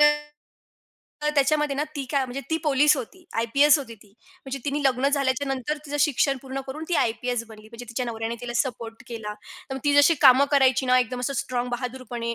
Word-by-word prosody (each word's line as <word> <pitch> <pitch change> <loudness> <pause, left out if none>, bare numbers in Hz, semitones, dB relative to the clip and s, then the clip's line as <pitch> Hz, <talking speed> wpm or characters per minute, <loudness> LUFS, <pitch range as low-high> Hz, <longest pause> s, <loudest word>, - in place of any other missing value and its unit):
अ 295 - +8 1.2
तर - - +3
त्याच्यामध्ये 285 0 +2
ना 295 - 0
ती 275 - -3
काय 275 -2 +1
म्हणजे 255 +2 -5
ती 320 - +2
पोलीस 295 +1 +4
होती, 345 +9 -8 0.2
आयपीएस 280 +6 +4
होती 245 -5 -8
ती. 205 -1 -21 0.4
म्हणजे 270 0 -5
तिने 290 +1 -1
लग्न 265 0 +2
झाल्याच्या 275 -1 0
नंतर 270 +3 -3
तिचं 290 +1 -3
शिक्षण 280 -1 +2
पूर्ण 270 0 -5
करून 300 +4 -6
ती 350 - 0
आयपीएस 240 +1 -1
बनली, 215 0 -14
म्हणजे 230 +1 -10
तिच्या 245 +2 -3
नवऱ्याने 225 0 -3
तिला 245 -1 -5
सपोर्ट 230 -2 -3
केला. 220 -3 -5 0.4
तर - - -3
मग 270 - -5
ती 290 - +3
जशी 285 +3 +6
कामं 265 0 +8
करायची 265 -2 +4
ना 255 0 +5
एकदम 250 0 -1
असं 265 +3 -2
स्ट्राँग 250 -2 -2
बहादुरपणे 245 -1 -4
260 Hz, 205 wpm, -25 LUFS, 240-280 Hz, 1.2 s, अ